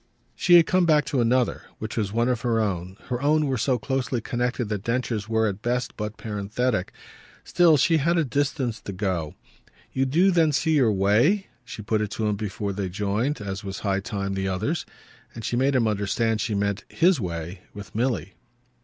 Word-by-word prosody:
She 175 - +4
had 170 -2 +8
come 185 0 +2
back 150 -2 +4
to 135 -4 0
another, 120 +1 +1 0.2
which 110 +1 -6
was 105 -3 -1
one 115 +2 +1
of 125 -2 0
her 115 -2 +1
own; 95 -3 -2
her 125 0 -2
own 150 +1 +3
were 135 -2 0
so 125 +2 +2
closely 130 +1 -2
connected 120 +2 -2
that 105 -3 -2
Densher's 115 -3 -2
were 110 0 +2
at 100 0 -4
best 120 +1 -1
but 105 0 -5
parenthetic. 105 0 -2 0.5
Still 170 -4 +4
she 165 +4 +3
had 170 +4 +2
a 165 - +2
distance 135 -4 -1
to 100 - -6
go. 90 -5 -2 0.6
"You 135 0 +1
do 175 +8 +4
then 165 -4 +3
see 160 +3 +1
your 125 -6 +4
way?" 110 - +2
She 110 -2 -8
put 110 0 0
it 105 - -1
to 110 - -2
him 105 -1 +1
before 100 -1 -3
they 95 -1 -3
joined 105 +8 -1
as 100 +1 -5
was 95 -1 -6
high 100 -2 0
time 100 -1 -3
the 95 0 -2
others. 110 - -2 0.5
And 115 -2 -6
she - - -1
made 135 +3 +2
him 120 -3 +3
understand 110 +2 0
she 105 - -1
meant 100 0 -1
his 170 -5 +3
way 85 0 -5
with 100 -2 -9
Milly. 110 - -1
115 Hz, 200 wpm, -25 LUFS, 100-135 Hz, 0.6 s, had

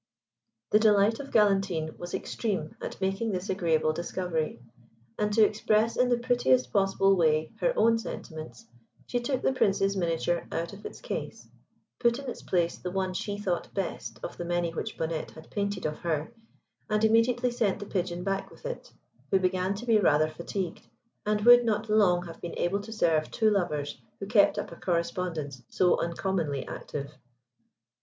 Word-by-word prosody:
The 210 - +6
delight 215 0 +4
of 280 0 -7
Galantine 195 -7 +2
was 175 0 -5
extreme 190 -9 -3
at - - -6
making 195 +4 -1
this 185 +1 -2
agreeable 160 -4 +1
discovery; 170 -3 -2 0.6
and 210 0 +1
to 220 0 +6
express 215 +1 +1
in 250 0 +3
the 245 - +3
prettiest 130 - +2
possible 195 0 +3
way 155 -3 +2
her - - +2
own 230 0 +4
sentiments, 155 - -8 0.4
she 245 - -1
took 255 +2 -2
the - - +2
Prince's 195 -5 +2
miniature 170 -1 0
out 170 +3 -3
of 200 +2 -7
its - - -12
case, - - -5 0.5
put 235 -1 +3
in 275 -1 -7
its 245 - -5
place 170 -2 0
the 180 - -4
one 185 0 -1
she 205 +2 -3
thought 185 -4 -2
best 195 -2 -4
of - - -6
the - - -4
many 175 -1 -1
which - - -4
Bonnette 160 -1 -2
had 160 0 -13
painted 200 -1 -2
of 150 0 -2
her, 160 -3 -2 0.6
and 215 0 +1
immediately 235 +2 +3
sent 230 -5 +1
the 205 - -7
Pigeon 180 -3 -2
back 195 0 -2
with - - -16
it, - - -6 0.4
who 195 - +4
began 185 +1 0
to 225 +5 -7
be 225 -3 +4
rather 155 -4 +3
fatigued, 170 +2 -4 0.5
and 210 0 +1
would 240 +2 +8
not 220 -1 -1
long 180 -5 +4
have 165 -1 -10
been 170 - -6
able 190 +3 +1
to 215 +2 -9
serve 160 -8 +1
two 220 -2 +2
lovers 150 -8 -1 0.2
who 195 - -4
kept 205 0 +4
up - - -4
a - - -8
correspondence 170 -6 -2
so 180 -1 +3
uncommonly 170 -4 -2
active. 140 -1 -6
190 Hz, 175 wpm, -28 LUFS, 170-215 Hz, 0.6 s, would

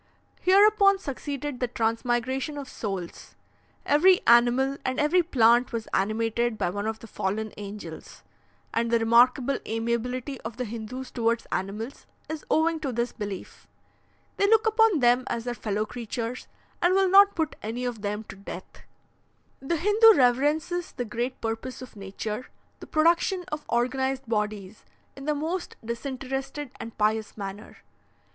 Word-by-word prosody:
Hereupon 400 +1 +5
succeeded 285 -4 -5
the 250 - 0
transmigration 240 +5 -1
of 280 -2 -6
souls; 195 -8 -6 0.5
every 360 +6 +5
animal 245 +3 +4
and 260 +1 -1
every 305 +5 +4
plant 240 -6 +4
was 230 -2 -4
animated 225 +3 0
by 175 - 0
one 205 +2 -3
of 220 0 -2
the 230 - -12
fallen 215 +1 -3
angels, 200 -5 -9 0.5
and 230 0 0
the 235 - +4
remarkable 245 +4 +4
amiability 235 +4 -2
of 225 +1 -7
the 250 - -2
Hindoos 235 +4 -6
towards 230 -1 0
animals 210 +7 -4 0.2
is 315 -1 -5
owing 320 +1 +2
to 285 -4 -3
this 235 +1 -1
belief. 205 -4 -7 0.7
They 400 - +3
look 445 +1 +4
upon 445 - +4
them 245 +1 +4
as 230 - -2
their 245 0 -3
fellow 215 -2 -2
creatures, 235 +1 -5 0.3
and 350 +2 +4
will 385 0 +4
not 400 +2 +7
put 320 -2 -1
any 235 +4 -4
of 240 -4 -4
them 210 +1 -3
to 195 - -11
death. 195 +1 -10 0.8
"The 325 +5 -1
Hindoo 420 +5 +6
reverences 295 +7 +1
the 245 - -3
great 240 +3 -3
purpose 225 +3 -4
of 255 - -12
nature, 210 +4 -5 0.3
the - - -10
production 340 +4 +2
of 300 0 -4
organized 265 +2 0
bodies, 210 -2 -3 0.3
in 275 - -9
the 300 0 +1
most 330 +5 -3
disinterested 270 +3 -4
and 230 - -8
pious 215 0 0
manner. 200 +1 -8
245 Hz, 150 wpm, -26 LUFS, 225-295 Hz, 0.8 s, not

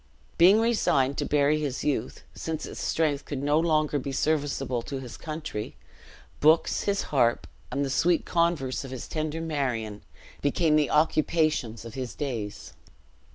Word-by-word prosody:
Being 190 +6 +7
resigned 140 - +2
to - - 0
bury 150 +1 +2
his 145 -4 -3
youth 145 -2 -2
since 160 -1 -4
its - - -8
strength 150 -3 0
could 140 -2 -5
no 145 +2 +3
longer 155 -3 +2
be 140 +1 -4
serviceable 140 -3 0
to 135 +3 -5
his 125 -3 -8
country 155 -9 -6 0.6
books, 155 +2 +3
his 200 -1 +1
harp, 120 -4 +3 0.3
and 140 0 0
the - - -3
sweet 170 +4 +2
converse 170 -7 0
of 135 - -8
his 130 -1 -6
tender 155 +1 -3
Marion, 125 -10 -2 0.4
became 150 +2 +2
the 150 -2 +3
occupations 155 -6 +1
of 115 - -8
his 130 -2 -5
days. 115 -8 -5
145 Hz, 155 wpm, -27 LUFS, 130-160 Hz, 0.6 s, Being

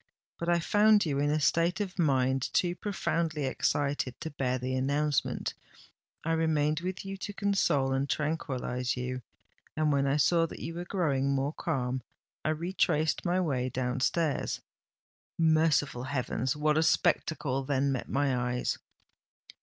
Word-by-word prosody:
But 170 - -2
I 170 0 +4
found 210 +4 +4
you 140 -3 0
in 145 +1 +2
a 155 +1 +2
state 170 +5 +2
of 195 -2 -4
mind 130 -4 +2
too 175 -1 +2
profoundly 165 -6 -1
excited 140 -1 -1
to 160 - -4
bear 130 -3 -1
the 130 +1 -3
announcement—I 145 +3 -3
remained 155 -2 +2
with 185 +2 -4
you 195 0 -5
to 205 +1 -6
console 195 -10 +1
and 135 +1 0
tranquillise 130 -5 -2
you—and, 125 +4 -4
when 140 -1 +2
I 140 +2 +2
saw 165 +2 +3
that - - -9
you 165 - -5
were 175 +1 -5
growing 145 -8 0
more 140 +2 0
calm, 130 -6 -2 0.4
I - - 0
retraced 160 -1 0
my 180 +1 +2
way 130 -8 0
down 130 0 -2
stairs. 155 +3 0 0.8
Merciful 155 -5 +2
heavens! 130 -1 -1
what 150 +1 +2
a - - +3
spectacle 150 -4 +1
then 140 0 +1
met 130 - -3
my 140 -1 +1
eyes!" 125 0 -1
150 Hz, 145 wpm, -30 LUFS, 130-165 Hz, 0.8 s, I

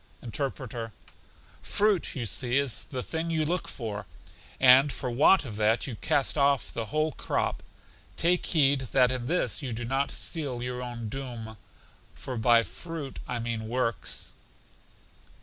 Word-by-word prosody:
Interpreter: 120 -3 -4 0.7
Fruit, 205 -3 +1
you 125 -4 -3
see, 120 +4 +1
is 140 -4 0
the 130 -2 -5
thing 165 +1 -3
you 160 -2 +1
look 175 +3 -1
for, 105 -4 -5 0.5
and 130 +2 +7
for 125 -1 -3
want 145 +7 +5
of 110 -4 -6
that 110 +2 +2
you 130 - -5
cast 140 +5 +1
off 140 -2 +2
the 115 -1 -3
whole 155 +7 0
crop. - - -2 0.6
Take 175 +2 +2
heed 140 -5 +3
that 125 -2 +5
in 125 -2 -2
this 175 +1 +1
you 130 -4 -4
do 120 +2 -4
not 135 +3 0
seal 140 -7 -2
your 125 0 -4
own 120 -2 -5
doom; 115 -3 -6 0.6
for 130 - -6
by 115 0 +5
fruit 160 -1 -7
I 125 - -2
mean 115 -1 -3
works. 115 -1 -2
130 Hz, 150 wpm, -28 LUFS, 115-145 Hz, 0.7 s, and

